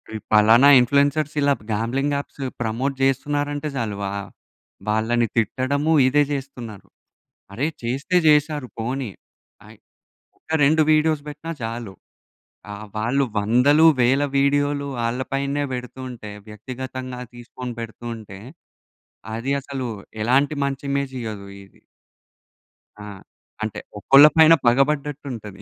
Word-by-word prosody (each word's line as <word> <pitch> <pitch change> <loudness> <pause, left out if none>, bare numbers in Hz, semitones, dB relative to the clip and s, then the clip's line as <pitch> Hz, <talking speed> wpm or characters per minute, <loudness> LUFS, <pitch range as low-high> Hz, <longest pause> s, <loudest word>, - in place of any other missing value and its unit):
ఈ - - -2 0.2
పలానా 110 +5 +6
influencers 140 +4 +2
ఇలాప్ 140 -4 +1
gambling 130 +7 -1
apps 140 0 -8 0.2
promote 120 +5 -1
జేస్తున్నారంటే 145 +2 0
జాలు, 110 -4 -2
వా 100 - -2 0.8
వాళ్ళని 115 +2 +1
తిట్టడము 135 +7 0 0.2
ఇదే 145 +2 +3
జేస్తున్నారు. 125 -7 -6 0.7
అరే 130 +9 -1 0.2
చేస్తే 135 +9 -2
జేశారు 150 -2 +3
పోనీ. 125 +1 -3 0.6
అయ్ - - -15 0.6
ఒక, - - -40 0.2
2 155 +3 +4
వీడియోస్ 155 -1 +2
బెట్టినా 155 +3 -7
జాలు. 115 -2 -5 0.8
ఆ - - -6 0.2
వాళ్ళు 130 +6 +1
వందలు, 125 +9 +4 0.2
వేల 135 +4 +3 0.2
వీడియోలు 140 0 +1
వాళ్ళ 115 +1 -1 0.2
పైనే 140 +1 -1
పెడుతుంటే, 125 -3 -7 0.2
వ్యక్తిగతంగా 130 +3 -7
తీసుకొని 120 0 -8
పెడుతూ 115 +1 -8
ఉంటే, 100 -3 -11 1.0
అది 130 +5 -2
అసలు 130 -2 -5 0.3
ఎలాంటి 140 +5 +2
మంచి 140 0 -4
ఇమేజ్ 140 -1 -2
ఇయ్యదు 105 -3 -6 0.2
ఇది. 95 - -25 1.2
ఆ! - - -9 0.6
అంటే, 110 - -4 0.2
ఒకళ్ళ 135 +7 +7
పైన 160 0 +8
పగబడ్డట్టు 140 +3 +1
ఉంటది. 105 -4 -9
130 Hz, 115 wpm, -22 LUFS, 115-145 Hz, 1.2 s, పైన